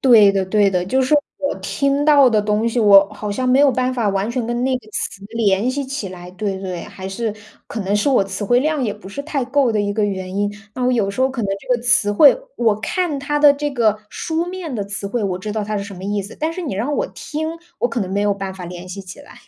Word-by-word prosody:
对 225 -6 +7
的 195 -1 0
对 200 +1 +3
的， 180 -2 0
就 260 +7 +2
是 260 +4 +2 0.2
我 280 - -1
听 280 +1 0
到 285 -4 +6
的 215 -2 +3
东 210 +2 +1
西， 235 - -2
我 200 -3 +7
好 210 0 -5
像 255 +5 -1
没 255 +1 +4
有 285 0 +6
办 255 +1 0
法 235 -4 0
完 195 +2 -1
全 240 -1 -2
跟 240 +1 -1
那 260 0 +1
个 220 -3 -19
词 195 0 -4
联 220 0 +1
系 280 +2 -2
起 265 -6 -4
来， 180 -1 -10
对 195 0 -3
对。 185 -3 -4
还 190 -2 -8
是 215 +2 -3 0.3
可 225 - -5
能 195 +1 -1
是 210 - +1
我 255 -7 +4
词 195 +2 -4
汇 245 +5 +3
量 305 0 0
也 215 -5 -1
不 210 -2 -12
是 200 - -6
太 285 -3 -2
够 265 -2 +2
的 215 - +1
一 205 0 -1
个 210 0 +1
原 190 -2 -3
因， 205 0 0 0.2
那 250 - -2
我 250 - +3
有 215 -5 +1
时 200 - -5
候 260 - +4
可 255 -3 -4
能 200 - -2
这 250 +5 0
个 240 - -10
词 235 -4 +3
汇 285 - +7 0.2
我 220 -3 +2
看 335 - -1
它 295 +1 -1
的 290 -1 +7
这 290 +1 -3
个 220 -5 +2
书 330 +1 -2
面 355 -4 -6
的 205 - -2
词 200 0 -4
汇， 225 +3 -2
我 185 -2 -2
知 210 +3 -5
道 215 -1 -2
它 210 +1 -3
是 200 - -2
什 200 -1 -9
么 185 - -8
意 205 0 -1
思。 200 - -10
但 315 +2 -1
是 365 +1 -5
你 245 - -3
让 245 +9 -1
我 - - 0
听， 315 +2 -5 0.2
我 240 - +1
可 235 0 -2
能 185 -3 -3
没 200 - 0
有 205 0 +2
办 195 -1 -5
法 185 -1 -8
联 175 +1 -8
系 190 +2 -6
起 190 +8 -11
来。 285 - -15
220 Hz, 300 characters per minute, -20 LUFS, 200-265 Hz, 0.3 s, 对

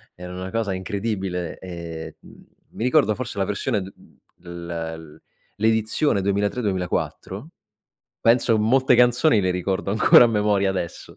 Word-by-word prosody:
erano 90 +1 -8
una 95 - -5
cosa 110 -2 -2
incredibile 95 -2 -3
e, 85 -3 -8
mhmm, - - -17 0.3
mi - - -5
ricordo 125 -3 +3
forse 120 -2 -6
la 100 - +1
versione 100 0 -1
d 95 - -11 0.4
l 90 - -20 0.5
l 80 -1 -14 0.4
l'edizione 110 +2 +1
2003-2004, 100 -2 -2 0.7
penso 115 0 +3
molte 125 +5 +3
canzoni 125 +1 +4
le 95 -1 0
ricordo 95 +2 -2
ancora 105 +3 +6
a - - -1
memoria 105 -2 +1
adesso. 95 -3 -6
100 Hz, 135 wpm, -23 LUFS, 95-115 Hz, 0.7 s, ancora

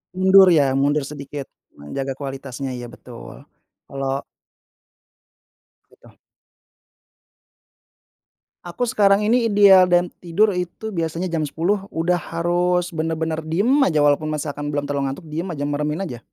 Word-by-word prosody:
Mundur 190 +1 +6
ya? 140 -4 +3
Mundur 145 +2 +1
sedikit 140 0 -8 0.3
menjaga 135 - -5
kualitasnya 135 -1 -6
iya 120 -1 -6
betul. 120 0 -12 0.4
Kalau 135 0 -3 1.7
Gitu. - - -21 2.5
Aku 175 +8 -3
sekarang 200 -1 +3
ini 230 +3 +2
ideal 200 -3 +6
dan 175 0 +2
tidur 180 +5 +1
itu 180 +5 -5
biasanya 170 -1 -3
jam 165 -2 -1
10.00 190 +7 -1
udah 175 +2 +1
harus 175 +2 -1
benar-benar 160 -1 -3
diem 175 +9 0 0.2
aja, 155 -4 +1
walaupun 145 +1 +2
misalkan 145 0 -4
belum 145 0 -2
terlalu 140 -1 -1
ngantuk 165 - -12
diem 160 +4 -4
aja, 145 -2 -4
meremin 150 +3 -2
aja. 130 -11 -5
160 Hz, 125 wpm, -21 LUFS, 145-180 Hz, 2.5 s, Mundur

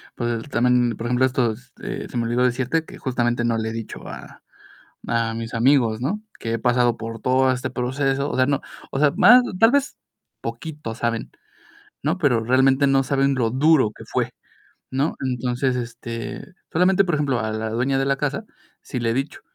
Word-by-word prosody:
pues 120 +1 -2
también, 120 -2 +2
por 115 - -4
ejemplo, 125 +2 +3
estos, 125 -2 -1
eh, - - -5
se - - -5
me 120 - +1
olvidó 120 +2 +1
decirte 130 +6 0
que - - -12
justamente 120 -2 0
no 115 -1 +1
le 110 0 -2
he - - -4
dicho 115 -1 -7
a - - -10 0.7
a 115 -1 0
mis 115 0 -5
amigos, 120 -3 +3
¿no? 180 - -2 0.2
Que 115 0 -3
he 115 - -1
pasado 125 -1 +2
por 115 0 -6
todo 130 +1 +3
este 125 -1 -3
proceso. 135 +3 -1
O - - -3
sea, 130 - +4
no, 140 0 0 0.3
o 135 - -2
sea, 145 -1 +4
más 245 +2 +8 0.2
tal 225 +2 +6
vez 280 +1 +1 0.4
poquito 150 -8 -6
saben, 115 0 -2 0.7
¿no? 155 +6 +1
Pero 135 -10 +2
realmente, 130 +3 +4
no 135 -1 +4
saben 140 +1 +1
lo 120 -3 +1
duro 130 -2 +3
que - - -10
fue, - - -1 0.6
¿no? 135 +4 0
Entonces, 125 +1 -1
este, 115 -1 -5 0.3
solamente, 185 +3 +4
por 175 - -1
ejemplo, 140 -4 0
a 110 -1 -2
la 110 +1 -3
dueña 130 +4 0
de 135 - +1
la 140 0 +2
casa 150 +10 -2 0.4
sí 130 - -5
le 115 -1 0
he - - 0
dicho, 135 +3 -3
125 Hz, 195 wpm, -22 LUFS, 115-140 Hz, 0.7 s, más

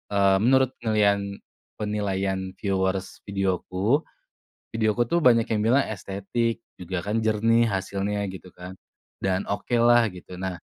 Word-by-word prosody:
eee, 100 -1 +4
menurut 130 +3 +3
penilaian 105 -3 +2 0.6
penilaian 95 -3 -2
viewers 95 -1 -2
videoku, 95 - 0 0.7
videoku 110 +1 +1
tuh 170 - +3
banyak 120 -7 +5
yang 110 - +1
bilang 120 +6 +3
estetik 110 +3 -3 0.2
juga 90 -1 -4
kan 105 +4 -1
jernih 115 +2 +3
hasilnya 100 0 -2
gitu 95 -1 -11
kan 90 +1 -10 0.4
dan 95 0 0
okelah 120 +2 +3
gitu. 90 0 -10
Nah, 95 -1 -3
100 Hz, 125 wpm, -25 LUFS, 95-115 Hz, 0.7 s, banyak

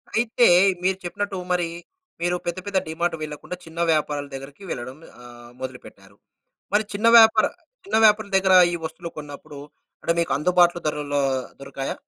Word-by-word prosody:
అయితే, 235 +2 +2 0.4
మీరు 190 0 +1
చెప్పినట్టు 195 +2 -4
మరీ, 175 -1 +1 0.5
మీరు 175 +1 0
పెద్ద, 175 +1 -3
పెద్ద 200 -1 -1
డీమార్టు 165 +1 -2
వెళ్ళకుండా, 155 +4 -7
చిన్న 165 +1 -10
వ్యాపారల 150 -2 -1
దగ్గరికి 135 +6 -9
వెళ్ళడం 130 +3 -6 0.3
ఆహ్, 120 0 -13
మొదలుపెట్టారు. 100 -6 -10 0.6
మరి 215 - +3
చిన్న 210 +3 0
వ్యాపార 220 -1 +6 0.4
చిన్న 390 - -1
వ్యాపారుల 210 -1 +4
దగ్గరా 190 -1 +4 0.2
ఈ - - -1
వస్తువులు 170 +2 -6
కొన్నప్పుడూ, 145 0 -10 0.4
అంటే, 170 - +1
మీకు 170 - -1
అందుబాట్లు 175 +2 +3
ధరల్లో 145 -1 -1 0.4
దొరకాయా? 140 0 -5
170 Hz, 145 wpm, -23 LUFS, 145-190 Hz, 0.6 s, వ్యాపార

